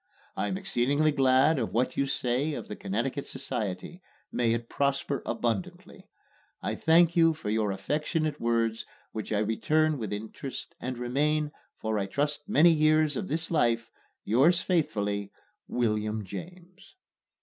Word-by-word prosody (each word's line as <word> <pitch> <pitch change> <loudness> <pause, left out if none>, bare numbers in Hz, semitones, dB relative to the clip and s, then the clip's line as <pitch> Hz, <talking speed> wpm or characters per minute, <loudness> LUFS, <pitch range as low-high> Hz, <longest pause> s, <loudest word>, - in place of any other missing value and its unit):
I - - -1
am 190 - -2
exceedingly 150 -4 +2
glad 135 +2 +4
of 115 - -2
what 120 +3 +1
you 140 - +1
say 135 +3 0
of - - -6
the 105 - -6
Connecticut 120 +9 -3
Society. 105 - -4 0.3
May 120 -2 +1
it 115 0 -5
prosper 140 0 -1
abundantly! 185 - -3 0.5
I - - -2
thank 165 +1 +4
you 165 -1 +5
for 105 -9 -4
your 110 -2 +1
affectionate 150 - -1
words 115 -1 +1 0.3
which 110 - -5
I 105 - +2
return 150 +8 +1
with 110 -3 -4
interest 110 +9 -6
and 130 -5 -4
remain, 150 +5 0 0.3
for 110 -1 -1
I 100 - -2
trust 145 +6 -1
many 165 +4 +6
years 155 -1 +3
of 205 -3 -3
this 160 +3 -2
life, 115 -7 +1 0.3
Yours 140 - +4
faithfully, 105 - -1 0.4
WM. 110 -2 0
JAMES. 180 - -10
135 Hz, 145 wpm, -28 LUFS, 115-155 Hz, 0.5 s, many